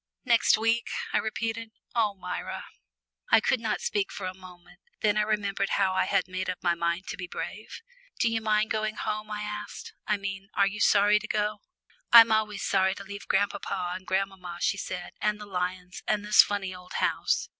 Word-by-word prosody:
"Next 235 -3 +5
week," 225 +1 +1 0.2
I - - +4
repeated. 225 +1 -3 0.2
"Oh, 215 -4 +1
Myra!" 185 - -5 0.6
I - - +7
could 240 +3 +1
not 225 -2 -2
speak 205 -2 -1
for 195 - -6
a 185 - -3
moment. 180 -1 -15 0.2
Then 210 -1 +3
I 210 - +3
remembered 205 -2 0
how 190 -2 +2
I 185 - +2
had - - +1
made 185 0 -3
up 185 - -2
my 175 -1 +3
mind 170 +2 -1
to - - -5
be 180 - -5
brave. 215 - -7 0.3
"Do - - +2
you 225 -1 0
mind 215 0 +1
going 215 0 -1
home?" 215 0 -3
I 210 0 -4
asked. 210 - -6
"I 210 - +2
mean, 195 0 -6
are 200 - +4
you 205 +1 -3
sorry 205 +1 +5
to 215 - -8
go?" 210 0 -1 0.5
"I'm 230 -1 +10
always 215 -1 +1
sorry 190 0 +2
to 200 - -8
leave 200 +1 -9
grandpapa 195 -2 0
and 185 0 -9
grandmamma," 190 -2 -2
she 200 - +1
said, 180 -2 -5
"and 210 0 +1
the 210 - -8
lions, 180 -1 -4
and 210 -1 0
this 210 0 +8
funny 195 -2 -2
old 180 0 -12
house. - - 0
205 Hz, 200 wpm, -28 LUFS, 185-215 Hz, 0.6 s, I'm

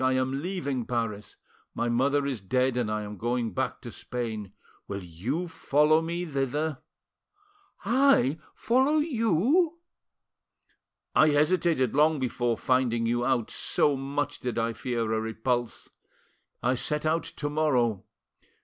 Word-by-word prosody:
I 130 0 +3
am 130 +1 0
leaving 145 -9 -3
Paris; 115 -4 -3 0.4
my 120 - -1
mother 140 +4 +2
is 130 -7 -3
dead, 125 +5 +1
and 120 -3 0
I 110 0 -2
am 105 0 -7
going 120 0 -1
back 130 - -2
to 120 - -8
Spain. 110 -6 -5 0.4
Will 100 -1 -5
you 115 - -3
follow 155 -1 +3
me 170 +2 -3
thither?" 145 0 -2 1.1
"I— 235 - +3 0.2
follow 265 +6 +2
you?" 295 - +2 1.4
"I 155 - +6
hesitated 150 -3 +2
long 155 +2 +4
before 120 -3 -1
finding 125 -3 +1
you 120 +1 0
out, 120 -3 0
so 145 -2 +1
much 140 +1 -3
did 125 -1 -3
I 115 0 0
fear 115 -1 -2
a 110 - 0
repulse. 115 +2 -2 0.7
I 125 +1 +3
set 150 +4 -2
out 160 +2 +2
to 145 - -5
morrow. 125 -9 +1
130 Hz, 135 wpm, -27 LUFS, 120-155 Hz, 1.4 s, I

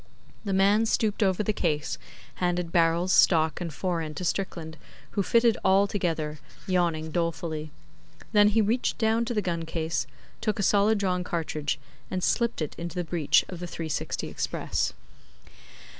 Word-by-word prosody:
The 200 - -1
man 200 +4 +4
stooped 215 -1 0
over 190 0 +2
the 215 - 0
case; 155 -7 -1 0.4
handed 175 -1 -1
barrels, 170 +2 +3
stock, 160 -2 +4
and 170 -2 -3
fore 170 +3 -2
end 155 -2 -6
to 180 - -3
Strickland, 170 -4 -3 0.4
who 205 - 0
fitted 230 +2 +3
all 195 +1 +5
together, 165 -7 -2 0.3
yawning 170 -4 0
dolefully. 165 -2 -2 0.6
Then 210 -1 +6
he 215 +2 +3
reached 230 +5 0
down 225 +1 +2
to 240 0 -3
the 210 - +1
gun 170 -2 -2
case, 160 0 -2 0.3
took 215 -2 0
a 200 - 0
solid 205 +3 +4
drawn 180 -3 0
cartridge, 155 -4 -2 0.3
and 185 -1 -3
slipped 235 -8 +1
it 150 - -5
into 170 +1 -5
the 180 - -1
breech 165 -3 +2
of 180 - -7
the 175 - -5
'360 160 -2 -3
Express. - - -2
180 Hz, 160 wpm, -27 LUFS, 165-205 Hz, 0.6 s, Then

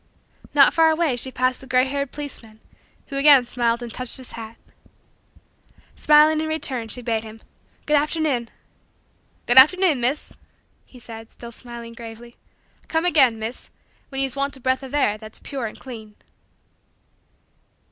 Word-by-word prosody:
Not - - +6
far 325 -1 +4
away, 320 -4 +1
she 245 +2 -1
passed 255 0 -1
the 265 - -12
gray 255 -1 +3
haired 280 0 -3
policeman, 230 -7 -8 0.5
who 275 - -5
again 275 -3 +6
smiled 235 0 -1
and 235 - -8
touched 255 0 -1
his 260 -2 -8
hat. 225 0 -9 1.4
Smiling 305 +1 +4
in 315 - -3
return 275 -7 -2
she 245 +3 -5
bade 225 -1 -1
him: 220 0 -11 0.5
"Good 300 0 +3
afternoon." 295 -5 -1 1.0
"Good 245 +2 +8
afternoon, 320 -1 +5
Miss," 260 +5 -1 0.5
he 255 - -16
said, 225 -1 -11
still 235 -1 -11
smiling 235 -1 -10
gravely. 235 +1 -11 0.5
"Come 325 0 -1
again, 270 -10 +4
Miss, 220 +3 -7 0.4
when 270 -1 -1
ye's 270 -1 0
want 280 0 -2
a - - -15
breath 260 +1 0
of 270 +1 -7
air 215 -7 +1
that's 215 0 -12
pure 265 -5 -5
and - - -11
clean." 220 -5 -10
255 Hz, 155 wpm, -22 LUFS, 235-285 Hz, 1.4 s, Good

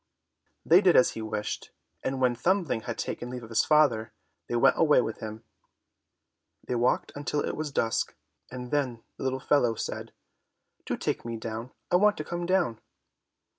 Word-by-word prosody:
They 175 +4 +7
did 185 -3 +5
as 125 - +6
he 110 - -6
wished, 110 -1 -4 0.3
and 130 0 -2
when 125 -1 +3
Thumbling 170 - +1
had 115 - -4
taken 120 - -4
leave 125 -1 -6
of 110 - -10
his 115 - +3
father, 140 -8 +3 0.3
they 120 - -2
went 120 - +4
away 150 -4 +5
with 115 -3 -2
him. 110 +1 -7 1.2
They - - -2
walked 120 +1 +1
until 145 0 -1
it - - -3
was 155 -1 -3
dusk, 115 -5 0 0.3
and 125 -1 -7
then 130 -6 -1
the - - -6
little 130 0 -1
fellow 125 -4 +2
said, - - -5 0.8
"Do - - -1
take - - -2
me 115 -1 -4
down, 115 +2 -5 0.2
I 180 - +6
want 210 +2 +4
to 155 - -3
come 175 +2 -4
down." 175 -12 +1
125 Hz, 175 wpm, -28 LUFS, 115-150 Hz, 1.2 s, They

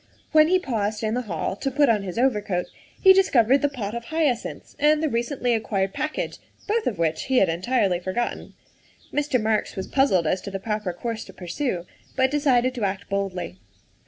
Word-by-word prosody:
When 310 -1 +6
he 370 +2 +4
paused 220 - -2
in 215 0 0
the 250 - 0
hall 165 +2 -2
to 270 - -2
put 285 +2 +3
on 220 -4 +3
his 190 -1 -6
overcoat 210 -8 +1 0.3
he 380 -1 +8
discovered 275 - +4
the 285 - +1
pot 220 -7 -5
of 235 0 -5
hyacinths 305 -5 -2
and 300 +1 +3
the - - +3
recently 245 +1 0
acquired 195 -4 -1
package, 305 - -3 0.3
both 440 +1 0
of 210 - -1
which 160 -1 0
he 265 -1 +1
had 195 - +4
entirely 185 +1 +1
forgotten. 185 +7 -3 0.6
Mr. 290 -3 +1
Marks 215 0 0
was 190 - -4
puzzled 265 -11 +2
as 180 +4 0
to - - -6
the 195 0 -4
proper 210 -2 -2
course 225 +5 -4
to - - -13
pursue, 180 0 -3 0.3
but 260 0 +2
decided 260 -4 +2
to 240 -4 -4
act 200 0 -2
boldly. 190 - -3
230 Hz, 190 wpm, -24 LUFS, 195-270 Hz, 0.6 s, he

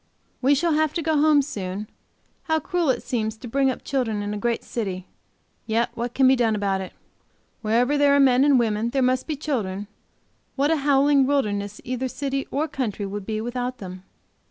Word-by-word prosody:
We 275 +2 +4
shall 330 +3 +1
have 310 0 +1
to 335 - -2
go 320 0 +1
home 295 -1 +4
soon; 200 -5 -5 0.6
how 320 -1 +1
cruel 350 -2 -1
it 260 - 0
seems 220 -3 -2
to 240 - -9
bring 270 +3 +2
up 255 - -4
children 225 -6 -1
in 205 0 -3
a - - -3
great 235 +2 -1
city! 190 -6 -4 0.6
Yet 230 +1 +1
what 240 +1 -4
can 265 -1 +5
be 265 - +6
done 230 -3 +2
about 195 -2 0
it? 190 - -8 0.7
Wherever 245 +6 +2
there 285 -1 +5
are - - +4
men 260 -1 +5
and 285 -2 +5
women 225 -1 +1
there 265 +1 +1
must 255 0 +1
be 310 - -2
children; 215 -10 -3 0.7
what 285 +3 +2
a 325 - +3
howling 280 -1 +3
wilderness 210 -7 -1
either 255 +1 -2
city 275 +1 -3
or 300 +3 -1
country 220 -8 -3
would 200 0 -6
be 215 -1 -2
without 245 +2 -3
them! 185 -1 -8
250 Hz, 200 wpm, -24 LUFS, 215-280 Hz, 0.7 s, be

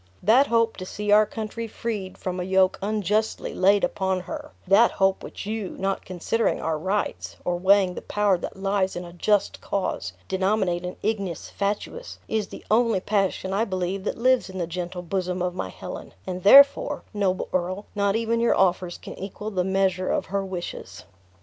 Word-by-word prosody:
That 245 +8 +5
hope 230 -1 +2
to 185 - -6
see 210 +1 -3
our 210 0 +6
country 225 +2 -5
freed 215 -4 -5
from 185 -1 -4
a - - -1
yoke 190 0 +2
unjustly 210 +1 -1
laid 200 +2 +4
upon 190 -1 0
her 295 - -7 0.2
that 205 +5 +5
hope 195 0 +2
which - - -8
you, 215 -2 -4
not 195 0 -2
considering 185 +5 0
our 160 -1 -1
rights, 195 +5 -2
or 175 - +1
weighing 190 +1 +4
the - - -6
power 205 -2 +2
that - - -6
lies 195 -1 0
in 175 0 -5
a 170 - -11
just 205 +3 +1
cause, 195 -2 -2
denominate 190 -2 0
an 180 - -5
ignis 200 -6 -2
fatuus, 210 - -3
is 215 -2 -1
the - - -11
only 225 -2 +3
passion 195 -1 0
I 205 +3 +2
believe 190 -2 -2
that - - -2
lives 255 -2 +3
in 190 - -7
the 175 - -1
gentle 175 +1 -5
bosom 185 0 -2
of 180 0 -1
my 135 - -4
Helen; - - -8
and 185 0 -4
therefore, 280 +6 +6
noble 195 -3 0
earl, 185 +3 -1
not 200 -1 +1
even 230 0 0
your 235 - +3
offers 180 -1 +1
can - - -9
equal 205 +2 -6
the 185 -3 0
measure 190 -1 +1
of - - 0
her 200 0 +1
wishes." 175 - -6
195 Hz, 185 wpm, -25 LUFS, 185-215 Hz, 0.2 s, our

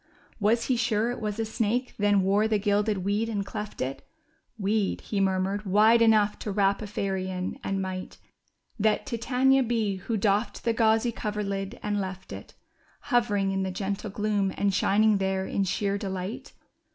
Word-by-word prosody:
Was 225 +3 +2
he 255 - +1
sure 230 -1 +1
it 245 - -6
was 210 0 -3
a 225 - 0
snake 230 +3 -1
then 205 -1 +3
wore 200 +3 +3
the 220 -1 +2
gilded 205 -1 0
weed 210 +3 0
and 205 -3 -2
cleft 210 0 -6
it? 130 +1 -3 0.6
^^Weed/' 205 0 0
he 205 - -3
murmured, 190 +1 0
^Svide 215 +4 +5
enough 215 -2 +4
to - - -5
wrap 195 0 +2
a 215 - -5
fairy 195 -2 -2
in." 185 +7 -4
And 195 -2 -1
might 185 0 -6 0.6
That 215 0 +2
Titania 260 +3 +2
be, 225 -5 0
who 220 +4 -3
doffed 205 +2 0
the 230 - +1
gauzy 225 +1 +3
coverlid 200 -3 -3
and 205 -1 0
left 190 -1 -6
it. - - -10 0.6
Hovering 205 -5 +2
in 195 0 -1
the 190 - -1
gentle 200 +3 -3
gloom, 205 -1 0
and 200 -1 +1
shining 210 +2 +3
there 190 0 0
in 195 - -1
sheer 200 +2 -1
delight 190 +2 -5
205 Hz, 175 wpm, -27 LUFS, 195-220 Hz, 0.6 s, ^Svide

